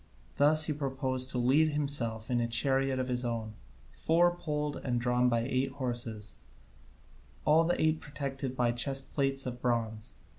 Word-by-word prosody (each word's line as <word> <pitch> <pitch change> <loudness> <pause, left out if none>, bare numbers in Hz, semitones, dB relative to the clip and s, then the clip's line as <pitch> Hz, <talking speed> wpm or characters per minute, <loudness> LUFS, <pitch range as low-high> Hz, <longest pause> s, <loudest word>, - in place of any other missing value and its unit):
These 155 +2 +4
he 150 - -1
proposed 130 -2 -1
to 125 - -3
lead 145 +6 +3
himself 125 -7 +1
in 120 -1 +2
a 115 - 0
chariot 135 +3 +1
of 130 0 -2
his 125 -1 0
own, 115 -3 -3 0.4
four 175 +2 +2
poled 150 -3 -3
and 120 -2 -2
drawn 125 +1 +2
by 115 -1 +1
eight 130 +2 -1
horses, 120 -5 -5 1.1
all 160 +2 +5
the 175 - 0
eight 155 0 +1
protected 135 -2 -5
by 120 -1 +2
chest 135 +3 -2
plates 135 -1 +1
of 125 -1 -5
bronze. 110 -3 -2
130 Hz, 160 wpm, -30 LUFS, 120-145 Hz, 1.1 s, all